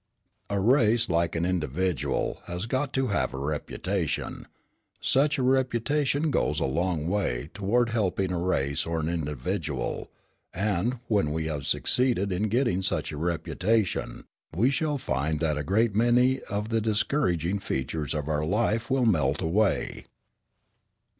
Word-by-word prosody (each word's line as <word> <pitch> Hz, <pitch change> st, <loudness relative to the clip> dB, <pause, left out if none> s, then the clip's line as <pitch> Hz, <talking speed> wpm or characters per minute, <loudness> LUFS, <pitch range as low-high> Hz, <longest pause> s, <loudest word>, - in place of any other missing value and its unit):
"A 100 Hz, -1 st, 0 dB
race, 115 Hz, +1 st, +3 dB
like 85 Hz, 0 st, +1 dB
an 85 Hz, +1 st, 0 dB
individual, 90 Hz, -1 st, -1 dB
has 90 Hz, +3 st, -4 dB
got 130 Hz, +4 st, -1 dB
to 130 Hz, -2 st, +1 dB
have 100 Hz, -, 0 dB
a -, -, -5 dB
reputation. 75 Hz, +5 st, -3 dB, 0.5 s
Such 145 Hz, +3 st, +2 dB
a 130 Hz, -, 0 dB
reputation 135 Hz, +4 st, +1 dB
goes -, -, +1 dB
a -, -, 0 dB
long 85 Hz, +2 st, -1 dB
way 90 Hz, -11 st, -1 dB
toward 115 Hz, +4 st, +1 dB
helping 95 Hz, -4 st, 0 dB
a 90 Hz, -, -1 dB
race 70 Hz, -6 st, 0 dB
or 85 Hz, 0 st, -2 dB
an 80 Hz, -, -1 dB
individual; 75 Hz, -2 st, -3 dB, 0.5 s
and, 105 Hz, +5 st, 0 dB
when 100 Hz, -9 st, +2 dB
we 80 Hz, +1 st, -2 dB
have 75 Hz, -3 st, -3 dB
succeeded 120 Hz, -6 st, +1 dB
in 95 Hz, +4 st, 0 dB
getting 115 Hz, -5 st, +1 dB
such 95 Hz, -, -1 dB
a 75 Hz, -, -6 dB
reputation, 90 Hz, +6 st, -1 dB, 0.3 s
we 120 Hz, +9 st, +3 dB
shall 150 Hz, +1 st, 0 dB
find 75 Hz, -, -1 dB
that 80 Hz, -2 st, +1 dB
a 75 Hz, -, -2 dB
great 105 Hz, +7 st, +2 dB
many 125 Hz, +4 st, +3 dB
of 105 Hz, +2 st, -2 dB
the 115 Hz, -1 st, +1 dB
discouraging 105 Hz, -, 0 dB
features 75 Hz, -2 st, -3 dB
of 75 Hz, -1 st, -3 dB
our 75 Hz, -1 st, 0 dB
life 110 Hz, +6 st, 0 dB
will 130 Hz, -2 st, +2 dB
melt 80 Hz, -, +2 dB
away. 95 Hz, +5 st, 0 dB
95 Hz, 145 wpm, -27 LUFS, 80-120 Hz, 0.5 s, race